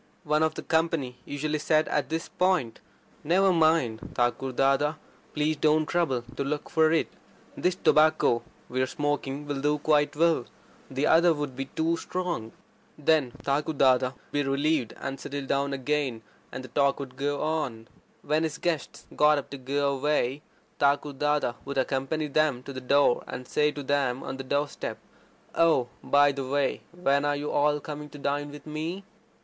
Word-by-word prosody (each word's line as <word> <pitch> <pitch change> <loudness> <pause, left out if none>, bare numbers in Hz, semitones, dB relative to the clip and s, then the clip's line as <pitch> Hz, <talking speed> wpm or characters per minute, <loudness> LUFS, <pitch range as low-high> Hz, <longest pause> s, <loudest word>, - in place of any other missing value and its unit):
One 150 +1 +1
of 160 0 +1
the - - -6
company 160 -6 0
usually 150 +1 -2
said 155 +1 +2
at 150 - 0
this 165 +1 -2
point: 180 -11 0 0.4
"Never 185 +4 +3
mind, 155 -9 +3 0.2
Thakur 120 +2 0
Dada. 135 +4 +2 0.4
Please 150 +1 0
don't 155 +1 +3
trouble 150 -8 0
to - - 0
look 145 +1 -3
for 160 -1 +4
it. 165 - +2 0.5
This 180 0 0
tobacco 155 -8 +4 0.3
we're 130 +1 0
smoking 145 0 -2
will 145 -2 -3
do 150 +1 +2
quite 150 0 +2
well. 160 -5 +2 0.4
The 135 +2 -1
other 165 0 +5
would 145 -3 -4
be 135 +1 -3
too 165 +4 -1
strong." 170 -12 -3 0.5
Then 150 -3 +2
Thakur 145 +3 0
Dada 130 -2 +3
would - - -29
be 145 - +1
relieved, 140 -2 0
and 135 - -5
settle 140 -1 -5
down 140 +1 0
again, 135 -3 -1 0.3
and 130 - -6
the 130 - -10
talk 140 +2 +2
would 130 -2 -7
go 145 +1 -1
on. 145 -8 -2 0.4
When 155 +1 +1
his 160 -1 -2
guests 165 -3 -3
got 150 0 +5
up 140 - -5
to 140 - -5
go 140 +2 0
away, 140 -1 0 0.4
Thakur 145 +1 +2
Dada 150 -2 0
would 140 0 -5
accompany 135 +4 0
them 150 -3 +1
to 140 - -8
the 130 - -6
door, 140 0 +3
and 125 0 -7
say 150 0 +2
to 145 - -6
them 135 -2 0
on 135 - -5
the 135 - -5
door 145 +3 0
step: - - -6 0.6
"Oh, 160 -7 +3
by 145 0 +5
the 135 -1 -5
way, 140 +1 0
when 140 -5 +1
are 145 0 +1
you 145 +1 -3
all 150 0 +2
coming 150 0 -7
to 145 - -11
dine 145 +1 -2
with 145 0 -11
me?" 160 +5 -4
145 Hz, 175 wpm, -27 LUFS, 135-155 Hz, 0.6 s, other